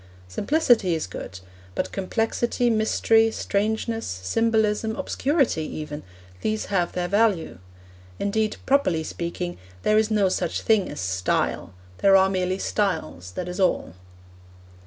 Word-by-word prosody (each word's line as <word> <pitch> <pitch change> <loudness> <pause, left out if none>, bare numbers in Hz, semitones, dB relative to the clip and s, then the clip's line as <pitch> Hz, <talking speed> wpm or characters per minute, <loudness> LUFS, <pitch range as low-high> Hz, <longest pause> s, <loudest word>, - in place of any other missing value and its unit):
Simplicity 220 - +2
is 160 - -2
good, 95 -1 -8 0.4
but - - -2
complexity, 225 +4 0
mystery, 225 0 +3
strangeness, 220 +2 -1
symbolism, 220 - 0
obscurity 280 - 0
even, 150 -1 -5 0.4
these 215 0 -1
have 175 -3 +1
their 180 -1 -1
value. 200 - +1 0.6
Indeed, 215 +1 0
properly 265 - +2
speaking, 175 +2 -4 0.2
there 215 0 +4
is 220 0 +1
no 210 -3 +3
such 185 - -1
thing 220 -4 +2
as - - -7
Style; 90 0 -1 0.2
there 195 -1 +6
are 190 0 +5
merely 185 0 0
styles, 160 - -2
that 180 - -4
is 180 +2 -5
all. 185 - +1
200 Hz, 125 wpm, -24 LUFS, 175-220 Hz, 0.6 s, there